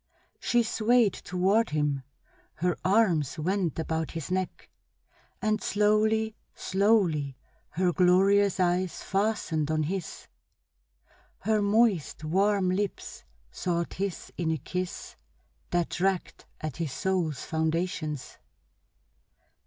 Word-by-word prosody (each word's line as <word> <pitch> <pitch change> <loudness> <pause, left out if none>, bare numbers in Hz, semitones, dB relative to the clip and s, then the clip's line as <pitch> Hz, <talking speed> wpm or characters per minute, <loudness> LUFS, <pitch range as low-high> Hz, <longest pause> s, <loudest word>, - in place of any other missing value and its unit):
She 240 -1 +2
swayed 225 -1 +3
toward 195 +5 +1
him, 150 -2 0 0.5
her 175 +1 0
arms 185 - +2
went 180 0 -1
about 160 -1 -2
his 165 +1 -6
neck, 185 0 -3 0.7
and 215 0 +1
slowly, 215 +1 +2 0.2
slowly 185 - +1 0.3
her 175 +2 +1
glorious 195 +2 +4
eyes 180 0 0
fastened 195 -7 0
on 155 0 +1
his, 180 +2 -4 1.1
her 215 +1 +2
moist, 205 -7 +2
warm 190 +3 +2
lips 200 +1 -3 0.3
sought 170 -1 -2
his 195 -1 -4
in 170 -2 0
a 160 - +1
kiss 180 +5 -5 0.5
that 175 -1 0
dragged 190 0 -1
at 155 -4 -5
his 165 -5 -2
soul's 170 -2 -1
foundations. 160 -2 -2
185 Hz, 105 wpm, -28 LUFS, 160-205 Hz, 1.1 s, glorious